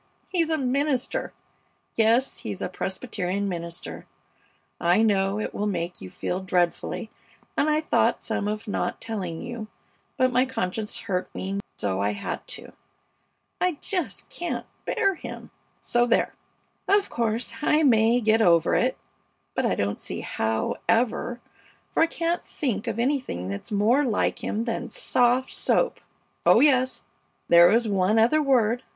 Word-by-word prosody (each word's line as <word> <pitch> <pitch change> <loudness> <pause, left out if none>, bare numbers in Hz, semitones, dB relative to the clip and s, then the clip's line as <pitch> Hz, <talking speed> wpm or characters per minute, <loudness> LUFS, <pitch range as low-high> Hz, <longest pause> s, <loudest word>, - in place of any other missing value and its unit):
he's 335 -4 +1
a 320 - +1
minister! 270 0 0 0.6
Yes, 230 +4 +2
he's 100 -3 -5
a - - -2
Presbyterian 190 0 -3
minister! 170 -2 -6 0.7
I 175 +6 +3
know 200 -1 +2
it - - -3
will 210 - -1
make 175 -3 -3
you 95 - -7
feel 180 - -3
dreadfully, 185 +4 -1 0.4
and 305 - +2
I 305 0 +2
thought 310 - +1
some 205 - -2
of 215 +2 -3
not 205 - -2
telling 185 -7 -4
you, 240 -3 -6 0.5
but 255 0 +3
my 250 +1 +4
conscience 215 -5 -3
hurt 180 -2 -2
me 195 +1 -3 0.2
so 95 -1 -1
I 100 +1 +1
had 100 - -5
to. - - -7 0.9
I 360 -1 +2
just 310 - -4
can't 345 0 -4 0.2
bear 390 - +2
him, 350 - -9 0.3
so 240 0 +2
there! 240 - +2 0.5
Of 400 0 +3
course, 230 0 -1
I 300 +1 +3
may 235 -2 +4
get 220 0 +3
over 170 -5 +4
it, - - +2 0.6
but - - +1
I - - +1
don't 100 +1 -1
see - - -5
how 110 0 -1
ever, 240 +1 +1 0.5
for - - +1
I 325 - +6
can't 335 +1 -1
think 235 -6 -3
of 230 -2 -2
anything 240 - -1
that's 100 - -6
more 220 +8 +3
like 230 -6 0
him 220 - -1
than 240 +1 -3
soft 245 +3 +2
soap! - - +1 0.4
Oh - - +6
yes, 260 -3 +3 0.5
there 170 0 +8
is 230 +1 +3
one 200 +1 +2
other 240 +8 +4
word. 245 -4 +2
225 Hz, 150 wpm, -25 LUFS, 190-255 Hz, 0.9 s, there